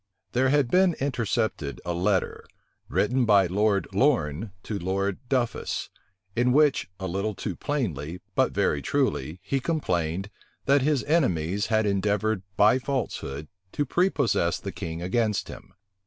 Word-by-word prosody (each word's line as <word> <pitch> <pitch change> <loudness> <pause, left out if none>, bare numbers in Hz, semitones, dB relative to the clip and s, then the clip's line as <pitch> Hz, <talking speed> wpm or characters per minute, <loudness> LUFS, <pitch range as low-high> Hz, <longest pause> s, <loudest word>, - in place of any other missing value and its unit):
There 130 +2 +2
had 140 -3 +2
been 185 -2 +4
intercepted 115 - -1
a 90 - -1
letter, 95 +2 0 0.4
written 125 +4 +2
by 100 -4 +5
Lord 100 +2 +1
Lorne 100 - +1
to 105 -2 -4
Lord 95 +2 -1
Duffus, 125 -4 -1 0.4
in 125 +1 +3
which, 145 -5 +3
a 95 - -4
little 100 +3 -2
too 95 -1 -4
plainly, 90 - -3
but - - +2
very 70 - +1
truly, 75 +5 -1
he 135 - 0
complained, 95 - -1 0.3
that 140 +1 +4
his 145 -1 +1
enemies 100 - +1
had 110 -1 +2
endeavored 105 +1 +1 0.2
by 110 +5 +5
falsehood 100 - -3 0.3
to 145 - 0
prepossess 140 - +1
the 100 - -5
king 85 -1 -5
against 105 +2 0
him. - - -10
105 Hz, 140 wpm, -26 LUFS, 90-130 Hz, 0.4 s, by